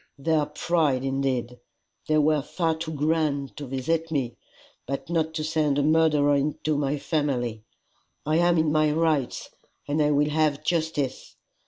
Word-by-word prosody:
Their 150 +1 +1
pride 150 -4 0
indeed! 135 -3 -2 0.5
They 155 - +2
were 150 0 +3
far 165 +3 -1
too 160 0 -5
grand 150 -2 0
to 145 - -6
visit 160 +6 -1
me, 130 -6 -1 0.5
but 140 +5 -4
not 160 -1 0
to 155 - -2
send 155 -2 +1
a 145 - +2
murderer 150 -2 +3
into 150 +2 -1
my 145 0 0
family. 130 -8 -1 0.6
I 155 +2 +2
am 175 0 +3
in 160 -1 +2
my 155 0 +3
rights, 155 -5 0 0.4
and 145 +2 0
I 150 - +3
will 150 0 +2
have 150 -1 +1
justice. 160 -5 -2
150 Hz, 155 wpm, -25 LUFS, 140-160 Hz, 0.6 s, were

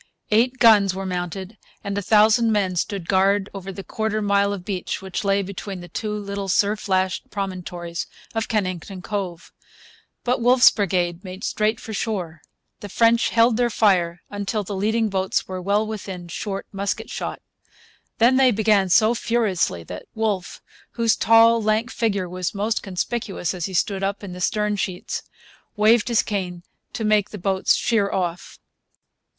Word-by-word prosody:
Eight 245 +4 +3
guns 205 -6 +5
were 195 0 -4
mounted 185 +3 -5 0.2
and 200 0 -3
a 205 - -1
thousand 220 +3 +4
men 195 -4 +1
stood 180 0 -2
guard 195 +1 +2
over 195 -1 -6
the 195 +1 -8
quarter 220 +1 -2
mile 200 -1 +2
of 195 -3 -5
beach 190 -3 -3
which 190 +1 -5
lay 200 0 +2
between 195 0 -6
the 175 - -9
two 215 +4 -4
little 200 -1 -4
surf 205 +2 +1
lashed 185 0 0
promontories 180 -3 -5 0.3
of 225 -1 -1
Kennington 185 -3 -3
Cove. 185 -4 -5 0.7
But 250 0 0
Wolfe's 245 +1 +6
brigade 180 -3 -1
made 185 0 -8
straight 215 +1 0
for 220 - -8
shore. 180 -8 -3 0.4
The 205 - -8
French 230 +3 +3
held 230 0 +3
their 245 -1 +2
fire 180 -6 +2
until 205 +1 -2
the 200 +1 -5
leading 220 +3 +1
boats 190 -1 -1
were 185 -1 -5
well 200 +3 +1
within 195 -5 -6
short 195 +3 -4
musket 200 0 -3
shot. - - -4 0.8
Then 245 +3 +4
they 265 -1 +6
began 210 -3 +2
so 220 +5 +5
furiously 210 - 0
that 90 +2 -9
Wolfe, 210 -5 -2 0.3
whose 230 -2 +2
tall, 230 0 +5
lank 215 +3 0
figure 200 -5 -1
was 180 +2 -4
most 215 +3 -1
conspicuous 195 -1 -3
as 175 -3 -3
he 190 - -6
stood 195 +2 0
up 200 +1 -2
in 190 -3 -7
the 180 - -8
stern 210 +2 0
sheets, 185 -2 -3 0.5
waved 215 +1 +4
his 235 -2 +2
cane 180 -4 -4 0.3
to 225 - -4
make 215 -2 +2
the 210 - -8
boats 190 0 +2
sheer 210 -4 +1
off. 175 -2 -3
200 Hz, 165 wpm, -22 LUFS, 185-220 Hz, 0.8 s, Wolfe's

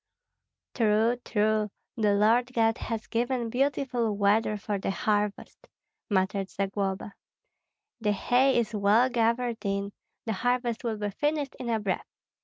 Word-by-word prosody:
"True, 225 +1 +2
true, 215 0 +1 0.3
the 210 -4 +2
Lord 230 +5 +3
God 225 -1 +2
has 225 -1 -4
given 240 0 -1
beautiful 250 -4 0
weather 210 +1 +2
for 205 -1 -3
the 195 - -2
harvest," 205 +1 -2 0.4
muttered 195 -1 0
Zagloba. 195 0 -3 0.9
"The 210 -2 +1
hay 250 +6 +3
is 230 -2 0
well 210 +5 +4
gathered 235 0 0
in, 200 0 -2 0.3
the 225 - -1
harvest 245 +2 -1
will 225 -2 -2
be 205 -1 -3
finished 295 +4 -1
in 245 - -4
a 225 -1 +1
breath. 200 -3 -2
220 Hz, 135 wpm, -28 LUFS, 205-240 Hz, 0.9 s, well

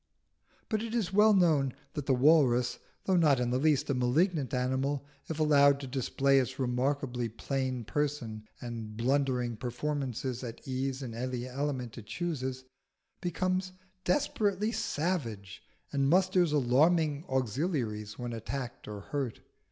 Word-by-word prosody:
But 215 -2 0
it 230 0 -4
is 200 -6 -1
well 210 +1 +6
known 155 -8 +3 0.2
that 145 -2 -4
the 130 - +4
walrus, 125 -3 +4 0.3
though 190 - +3
not 150 -6 +4
in 120 -1 0
the 125 - +1
least 150 -1 +2
a 140 - +1
malignant 135 +4 +1
animal, 130 +2 0 0.2
if 160 -1 -3
allowed 140 -2 +5
to 140 - -6
display 135 +1 +2
its 130 0 -2
remarkably 125 -1 -1
plain 130 +2 -2
person 115 -5 -2
and 115 -3 -6
blundering 125 -2 +1
performances 130 0 -3
at 120 +1 -8
ease 130 +1 -2
in 120 -3 -6
any 125 +1 -3
element 130 -3 -3
it 105 - -13
chooses, 130 -7 -3 0.6
becomes 185 +1 -1 0.3
desperately 215 -7 +1
savage 145 - -2 0.3
and 140 -1 +2
musters 180 -1 +4
alarming 150 +3 +3
auxiliaries 125 - -1
when 120 -1 -4
attacked 120 +3 -5
or 105 -1 -6
hurt. 135 +1 -3
135 Hz, 135 wpm, -30 LUFS, 125-155 Hz, 0.6 s, well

